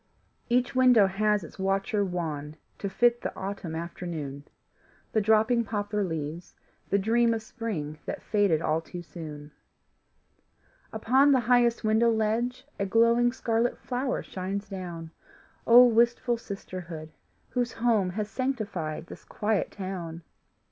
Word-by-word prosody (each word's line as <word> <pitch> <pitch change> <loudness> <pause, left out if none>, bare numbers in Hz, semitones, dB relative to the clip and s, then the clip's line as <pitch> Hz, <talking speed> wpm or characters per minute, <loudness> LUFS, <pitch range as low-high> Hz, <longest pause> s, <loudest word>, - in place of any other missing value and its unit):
Each 250 +1 +2
window 250 -5 +6
has 210 +1 +1
its 165 - -12
watcher 195 +2 0
wan 155 -5 -4 0.2
To 200 - -3
fit 240 +5 +3
the - - -3
autumn 190 -4 -5
afternoon, 160 -4 -5 0.7
The 220 - +2
dropping 220 +3 +3
poplar 205 -1 -2
leaves, 160 -1 -5 0.3
the 200 - +3
dream 230 +3 +2
Of 220 - -5
spring 180 -11 -5
that - - -5
faded 200 -7 +2
all 155 +1 +1
too 175 +1 -8
soon. 150 -3 -9 1.4
Upon 260 +6 +4
the 260 - +3
highest 240 0 +3
window 220 +2 +3
ledge 230 +4 0
A 200 - +1
glowing 235 +3 +4
scarlet 235 -1 0
flower 255 +1 -2
shines 195 +2 -4
down. 175 -4 -7 0.6
Oh, 245 +2 +9
wistful 235 +1 +2
sisterhood, 175 -7 -7 0.4
whose 245 -1 -1
home 225 -5 +2
Has 210 +3 -3
sanctified 210 - -3
this - - -11
quiet 210 -1 -1
town! 175 -4 -6
205 Hz, 130 wpm, -27 LUFS, 175-235 Hz, 1.4 s, Oh